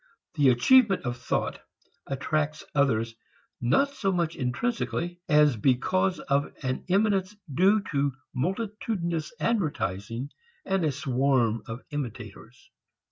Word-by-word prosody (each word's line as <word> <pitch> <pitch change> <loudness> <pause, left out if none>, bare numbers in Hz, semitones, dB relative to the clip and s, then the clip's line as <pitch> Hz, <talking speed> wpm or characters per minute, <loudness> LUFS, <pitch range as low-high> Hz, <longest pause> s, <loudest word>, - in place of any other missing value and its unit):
The 140 -3 +4
achievement 200 - +5
of 120 0 -1
thought 120 - -2 0.5
attracts 155 +2 -1
others 115 -6 +2 0.5
not 275 - +3
so 195 -8 -1
much 170 -3 0
intrinsically 150 - -2
as 150 -3 +5
because 180 - +1
of 140 +1 0
an 130 0 -2
eminence 195 0 +2 0.2
due 195 +7 +4
to 140 -1 +1 0.2
multitudinous 175 - -2
advertising 125 - -1 0.3
and 195 -7 0
a 155 - +2
swarm 130 -4 +1
of 115 +3 -6
imitators. 120 -3 -7
145 Hz, 110 wpm, -27 LUFS, 125-185 Hz, 0.5 s, achievement